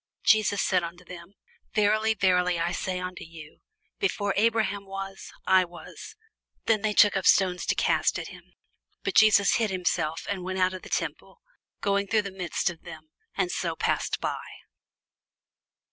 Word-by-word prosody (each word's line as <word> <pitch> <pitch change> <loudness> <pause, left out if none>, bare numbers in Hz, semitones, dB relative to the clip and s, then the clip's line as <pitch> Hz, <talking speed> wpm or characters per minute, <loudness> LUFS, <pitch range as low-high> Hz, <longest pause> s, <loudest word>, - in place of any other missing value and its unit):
Jesus 215 -2 +3
said 185 -1 +2
unto 175 +1 -8
them, 175 +2 -11 0.4
Verily, 215 +1 +2
verily, 180 -3 +2
I 170 +1 0
say 185 0 -3
unto 180 0 -6
you, 160 -2 -13 0.4
Before 205 - 0
Abraham 210 -2 +1
was, 195 0 -7
I 190 0 +5
am. 180 - -4 1.0
Then 220 -2 +2
took 205 - +6
they - - +1
up 190 - -1
stones 180 -2 +3
to - - +1
cast - - +1
at - - -6
him: - - -15 0.5
but - - -2
Jesus 210 -2 +5
hid 225 -2 0
himself, 175 -4 -1
and 195 -3 -3
went 185 +1 -4
out 185 0 +2
of 185 - -7
the - - -12
temple, - - -4 0.4
going 200 0 0
through 215 +1 +2
the 200 - -6
midst 180 -1 -2
of 165 - -14
them, 160 -2 -12 0.2
and 185 -3 0
so 170 -3 -2
passed - - -1
by. - - -3
190 Hz, 165 wpm, -26 LUFS, 180-205 Hz, 1.0 s, took